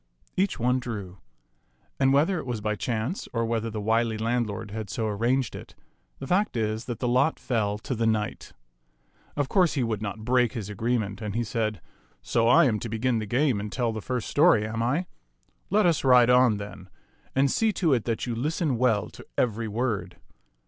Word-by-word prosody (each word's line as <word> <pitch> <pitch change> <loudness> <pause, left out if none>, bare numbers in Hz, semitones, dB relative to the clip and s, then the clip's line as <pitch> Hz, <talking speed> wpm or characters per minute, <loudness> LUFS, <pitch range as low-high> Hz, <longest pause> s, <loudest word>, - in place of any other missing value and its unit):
Each 195 +1 0
one 125 +2 +2
drew, 100 -7 -6 0.8
and 135 -1 +4
whether 160 +6 +3
it - - -7
was 120 -3 -2
by 105 0 -1
chance 120 - -3
or 115 -1 0
whether 115 0 -1
the 110 -1 -5
wily 110 +1 +1
landlord 110 -2 -2
had 110 -1 -5
so 110 +6 -2
arranged 115 +4 0
it, - - -10 0.4
the 135 - -7
fact 185 - +1
is 110 +1 -1
that 120 -3 -4
the 125 - -2
lot 130 +6 +2
fell 105 -5 -1
to 110 - -4
the 115 -1 0
knight. 110 -1 -2 0.8
Of 145 -2 0
course 180 +1 +3
he 135 - 0
would 110 -3 -2
not 110 +1 -5
break 125 -2 +2
his 105 -3 -5
agreement, 110 -1 -2
and 105 -1 -4
he 120 - +1
said, 110 -1 -2 0.2
" - - -34 0.2
So 115 -1 +1
I 125 - +6
am 110 -5 +1
to 115 - -5
begin 115 +2 0
the 110 - -4
game 125 0 +1
and 105 0 -5
tell 120 -2 -1
the 110 - -5
first 125 -1 -3
story, 145 -8 +4
am 110 +1 -3
I? 140 +10 0 0.6
Let 210 +2 +3
us 170 -4 +2
ride 125 -2 +6
on, 125 -4 +5
then; 100 -2 -9 0.5
and 135 +1 +3
see 225 -1 +2
to 165 -7 +2
it 120 -4 0
that 115 -2 -1
you 120 - -2
listen 145 +1 -1
well 115 -5 +2
to - - -12
every 115 -1 0
word." 110 0 -2
115 Hz, 205 wpm, -26 LUFS, 110-130 Hz, 0.8 s, I